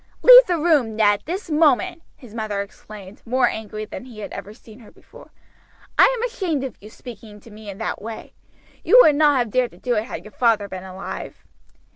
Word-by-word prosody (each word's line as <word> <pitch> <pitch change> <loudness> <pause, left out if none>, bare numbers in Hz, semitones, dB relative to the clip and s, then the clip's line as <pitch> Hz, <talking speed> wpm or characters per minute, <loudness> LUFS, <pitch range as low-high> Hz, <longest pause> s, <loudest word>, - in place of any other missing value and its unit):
"Leave - - +9
the 350 -2 0
room, 295 -9 +1
Ned, 205 -2 +2
this 355 +1 -6
moment," 325 +3 +2
his 245 -7 -16
mother 215 -3 -3
exclaimed, 200 0 -14
more 250 +1 +1
angry 215 -1 -6
than 255 - -9
he 240 -4 -14
had - - -8
ever 205 - -8
seen 220 +1 -16
her 225 - -16
before. - - -18 0.7
"I - - +7
am 460 - -4
ashamed 370 - -3
of 260 -4 -6
you 210 - -12
speaking 220 -2 -12
to 225 - -17
me 210 0 -11
in 195 - -8
that - - -5
way. 225 +1 -9 0.5
You - - +5
would 305 - +5
not 295 -2 +3
have 240 -4 -1
dared 250 0 +1
to - - -17
do 245 - -2
it 215 -1 -1
had - - -8
your 210 - -12
father 225 -4 +1
been 185 -1 -8
alive." 190 +1 -8
230 Hz, 210 wpm, -21 LUFS, 210-295 Hz, 0.7 s, Leave